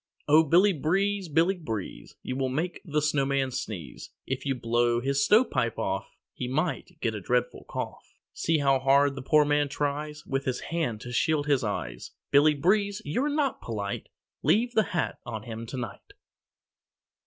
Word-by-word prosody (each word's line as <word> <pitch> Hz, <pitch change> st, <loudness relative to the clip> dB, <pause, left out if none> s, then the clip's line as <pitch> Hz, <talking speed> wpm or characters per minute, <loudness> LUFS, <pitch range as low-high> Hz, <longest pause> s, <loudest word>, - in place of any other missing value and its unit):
Oh, 155 Hz, +2 st, +7 dB
Billy 180 Hz, +6 st, +5 dB
Breeze, 195 Hz, +5 st, 0 dB
Billy 165 Hz, +5 st, +3 dB
Breeze, 115 Hz, -, -6 dB
You 130 Hz, -, -3 dB
will 130 Hz, -1 st, 0 dB
make 160 Hz, +7 st, -2 dB
the 150 Hz, -2 st, -1 dB
Snowman 140 Hz, -2 st, +1 dB
sneeze. 90 Hz, -, -6 dB, 0.2 s
If 130 Hz, +1 st, -3 dB
you 135 Hz, -, +1 dB
blow 120 Hz, 0 st, +1 dB
his 140 Hz, +2 st, +1 dB
stovepipe 210 Hz, -, +3 dB
off -, -, -3 dB, 0.2 s
He 125 Hz, -, -4 dB
might 160 Hz, +5 st, -2 dB
get 115 Hz, -, 0 dB
a 105 Hz, -, -5 dB
dreadful 125 Hz, +5 st, -1 dB
cough. -, -, -6 dB, 0.2 s
See 165 Hz, -1 st, +1 dB
how 135 Hz, -2 st, +3 dB
hard 140 Hz, +1 st, +4 dB
the 135 Hz, -, -6 dB
poor 150 Hz, +3 st, +4 dB
man 145 Hz, 0 st, +2 dB
tries 150 Hz, +1 st, -3 dB
With 135 Hz, -1 st, -2 dB
his 130 Hz, -1 st, -1 dB
hand 155 Hz, -11 st, -2 dB
to 125 Hz, -, -7 dB
shield 150 Hz, +4 st, +1 dB
his 140 Hz, -4 st, +2 dB
eyes. 100 Hz, -, -4 dB, 0.2 s
Billy 150 Hz, +2 st, +5 dB
Breeze, 200 Hz, +6 st, +1 dB
you're 250 Hz, -, 0 dB
not 290 Hz, -3 st, 0 dB
polite 100 Hz, -3 st, -4 dB, 0.3 s
Leave 240 Hz, +3 st, +3 dB
the 220 Hz, -3 st, +3 dB
hat 175 Hz, -, -1 dB
on 110 Hz, -4 st, -6 dB
him 115 Hz, 0 st, -7 dB
to 130 Hz, -, -6 dB
night. 120 Hz, -1 st, -7 dB
140 Hz, 170 wpm, -27 LUFS, 125-165 Hz, 0.3 s, Oh